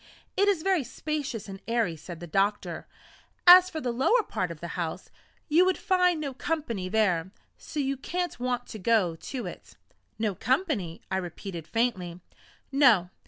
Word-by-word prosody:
"It 400 - +3
is 380 -6 +2
very 380 -6 +2
spacious 270 -3 -4
and 195 -1 -8
airy," 230 -7 +1
said 170 +1 -9
the - - -5
doctor; 195 +5 -1 0.6
"as 365 +1 +10
for 320 - -5
the 250 -5 -2
lower 270 - +3
part 185 - -2
of 165 -2 -8
the 170 - -6
house, 165 -2 -4 0.4
you 330 +4 +5
would 370 0 +2
find 360 -4 +2
no 285 -3 -4
company 255 - -3
there, 185 -5 +1 0.3
so 305 - -7
you 275 -1 0
can't 350 +2 -3
want 245 0 -1
to 220 - -7
go 195 -5 +2
to 250 +9 -6
it." - - -9 0.4
"No 220 -2 0
company!" 245 - -1
I 190 - +1
repeated 175 -2 -6
faintly. 190 -7 -1 0.5
"No. 235 -11 +4
235 Hz, 165 wpm, -27 LUFS, 185-305 Hz, 0.6 s, as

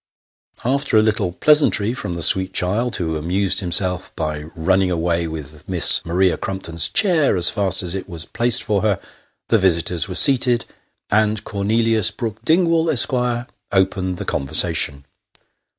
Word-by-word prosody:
After 135 -3 0
a 110 - +3
little 105 -4 -1
pleasantry 120 - +2
from 90 -9 -6
the 85 - -1
sweet 95 +2 +3
child, 110 +7 0
who 80 -4 -4
amused 90 +5 0
himself 90 -1 -2
by 75 -2 -5
running 95 +3 0
away 85 -1 -2
with 75 -1 -10
Miss 90 -4 +6
Maria 90 +1 0
Crumpton's 85 -4 0
chair 165 - +1
as 85 - +4
fast 95 -2 +2
as 90 -1 -2
it 95 0 -7
was 85 -1 -6
placed 120 +4 +1
for 105 -3 -2
her, 105 -3 -1 0.5
the 115 - +2
visitors 85 -3 0
were 90 - -6
seated, 125 +1 +4 0.5
and 110 0 0
Cornelius 110 +1 0
Brook 110 -4 -7
Ding 170 +2 +1
wall, 165 0 0
Esq., 140 -1 +2 0.6
opened 95 -1 -1
the - - -7
conversation. 70 +1 0
95 Hz, 150 wpm, -18 LUFS, 85-110 Hz, 0.6 s, Miss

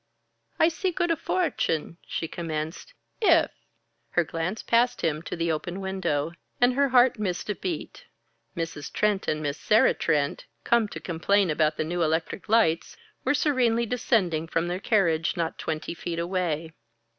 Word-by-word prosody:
"I 320 - +5
see 345 +3 -1
good 345 -1 0
a - - +3
fortune," 170 - -1
she 165 - -3
commenced, 160 - -5 0.3
"if 340 -6 +5 0.3
" - - -47
Her 175 - +5
glance 165 +6 -3
passed 240 +1 +2
him 155 -2 0
to 165 - -5
the 170 -1 0
open 175 +4 -3
window, 190 -6 -1 0.3
and 245 +1 +4
her 280 +1 +2
heart 250 -2 +5
missed 195 0 -2
a - - 0
beat. 175 -5 -5 0.5
Mrs. 165 -3 -4
Trent 210 -2 +1
and 155 0 -1
Miss 145 0 -2
Sarah 215 +1 +4
Trent, 145 -3 0 0.2
come 235 -2 +3
to - - -7
complain 185 +2 +1
about 155 0 +1
the - - 0
new 175 +2 -2
electric 160 +4 -1
lights, 215 -8 +2 0.3
were 260 +3 +2
serenely 245 -6 +2
descending 200 -9 +1
from 165 +1 -1
their 180 +1 -2
carriage, 175 -7 +1
not 165 -1 -2
twenty 155 0 -3
feet 170 0 -5
away. 170 -2 -2
175 Hz, 165 wpm, -26 LUFS, 160-230 Hz, 0.5 s, I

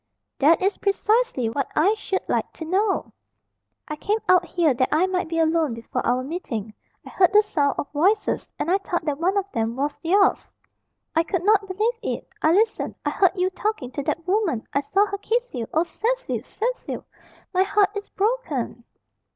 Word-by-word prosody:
"That 320 +6 +4
is 395 +2 +1
precisely 420 - +1
what 270 +5 -2
I 375 +8 +4
should 405 -3 -3
like - - -1
to 320 - -7
know." 385 +4 0 0.7
"I 305 - -4
came 415 +8 0
out 365 -1 +5
here 335 -5 +2
that 255 +1 +1
I 315 +4 +3
might 370 -3 -1
be 330 - -2
alone 320 -5 +2
before 230 0 -4
our 250 +1 +1
meeting. 240 - -5 0.3
I - - -9
heard 365 -2 +4
the 420 +1 +6
sound 295 -9 0
of 285 - -4
voices, 380 +9 +1
and 335 - -1
I 385 - +3
thought 345 -4 -3
that 295 -2 -1
one 370 +4 +1
of 395 - +1
them 225 +1 -1
was 285 +2 -2
yours 390 +4 +2 0.6
I 325 - +5
could 340 +2 -2
not 410 0 +3
believe 435 +5 -1
it. - - -4
I 315 - +4
listened. 430 +5 +1
I - - +1
heard 375 -3 +3
you 370 0 0
talking 410 - -3
to 285 - -3
that 330 +5 -3
woman. 370 - 0
I - - +3
saw 390 +8 +2
her 400 -1 -5
kiss 475 +4 -1
you. 235 -4 -3
Oh, 320 - +2
Cecil! - - -2
Cecil! - - -4 0.5
my 370 - +3
heart 400 +1 +3
is 410 0 -5
broken!" 385 - -2
365 Hz, 190 wpm, -24 LUFS, 295-410 Hz, 0.7 s, the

